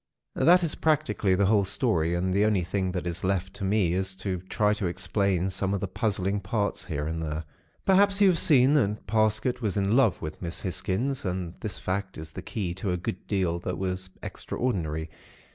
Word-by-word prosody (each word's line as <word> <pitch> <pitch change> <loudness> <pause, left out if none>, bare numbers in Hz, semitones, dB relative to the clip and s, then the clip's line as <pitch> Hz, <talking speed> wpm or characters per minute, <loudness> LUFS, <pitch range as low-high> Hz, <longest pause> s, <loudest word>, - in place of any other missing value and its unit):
"That 180 +2 +5
is 165 - +1
practically 105 -11 +1
the 100 +2 +2
whole 100 0 +4
story; 90 - +1
and 90 +1 0
the 100 +2 +3
only 105 -4 +2
thing 95 +1 -1
that 90 - -3
is 85 0 -3
left 95 0 -1
to 100 0 -6
me 95 -3 +2
is 95 +1 -1
to 95 -1 -3
try 105 -1 +2
to 105 -3 -2
explain 95 +1 0
some 95 +1 -1
of - - -2
the 100 - -2
puzzling 100 -1 -1
parts, 100 +1 -2
here 75 -3 -3
and 80 +1 -3
there. 80 0 -3 0.4
"Perhaps 195 +1 +4
you 200 - +6
have 175 - +2
seen 135 -2 +5
that 105 -8 +1
Parsket 110 +4 +1
was 105 -3 -1
in 100 +2 +2
love 125 -7 +4
with 80 -1 -7
Miss 85 -2 -4
Hisgins; 105 +8 -2
and 90 -2 -3
this 105 -3 -4
fact 95 +1 -3
is 80 -1 -8
the - - -7
key 95 -6 -3
to 95 +2 -4
a 90 - 0
good 90 +1 -5
deal 90 -4 0
that - - -4
was 95 0 -3
extraordinary. 80 -10 -3
95 Hz, 205 wpm, -27 LUFS, 90-110 Hz, 0.4 s, you